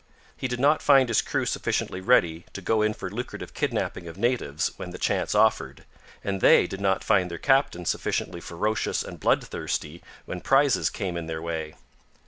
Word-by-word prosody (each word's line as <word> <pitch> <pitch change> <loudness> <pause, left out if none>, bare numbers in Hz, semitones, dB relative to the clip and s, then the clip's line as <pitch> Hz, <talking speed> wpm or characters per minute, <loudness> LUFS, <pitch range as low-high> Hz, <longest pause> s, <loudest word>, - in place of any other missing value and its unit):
He 130 - -3
did 125 -1 -4
not 145 +4 +3
find 135 -3 +5
his 115 - +3
crew - - -2
sufficiently 90 - -2
ready 85 -7 +2
to 100 - -6
go 110 +3 +2
in 105 0 +1
for 95 - -6
lucrative 120 +4 -6
kidnapping 85 - -2
of 85 - -9
natives 110 - 0
when - - -6
the - - -8
chance - - 0
offered, - - +2 0.4
and 95 -1 -2
they - - +6
did 95 - -6
not 95 -1 +1
find 95 -4 +2
their 85 - -5
captain 135 -10 +2
sufficiently 85 +1 -2
ferocious 105 +7 -1
and - - -9
bloodthirsty 80 +3 -1 0.2
when 90 - -6
prizes 135 -1 +3
came 90 -3 -4
in 85 -1 -4
their 80 -1 -4
way. 80 -2 -4
95 Hz, 180 wpm, -26 LUFS, 85-125 Hz, 0.4 s, they